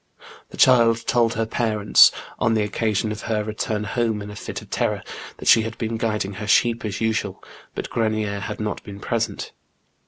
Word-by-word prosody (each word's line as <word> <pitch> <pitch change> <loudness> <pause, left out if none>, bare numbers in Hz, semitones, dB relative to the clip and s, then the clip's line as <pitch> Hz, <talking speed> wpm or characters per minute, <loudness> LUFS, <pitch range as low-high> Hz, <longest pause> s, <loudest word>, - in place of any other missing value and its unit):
The - - -12
child 115 -3 +5
told 115 -1 +2
her 115 +1 0
parents, 110 -2 +4 0.3
on 115 0 +2
the 110 - +2
occasion 105 0 -1
of 105 -1 -5
her 110 -2 -1
return 105 0 -3
home 110 0 -1
in 105 - -8
a - - -9
fit - - -6
of - - -19
terror, - - -1 0.3
that - - -8
she 115 - +7
had 110 0 -5
heen 115 -1 -3
guiding 105 -4 -1
her 105 - -4
sheep 115 +2 +3
as 105 -1 -4
usual, 105 -3 -1 0.3
hut - - -4
Orenier 110 -3 0
had 105 +1 -5
not 105 -1 -3
heen 100 -1 -9
present. 115 -1 -3
110 Hz, 190 wpm, -22 LUFS, 105-115 Hz, 0.3 s, she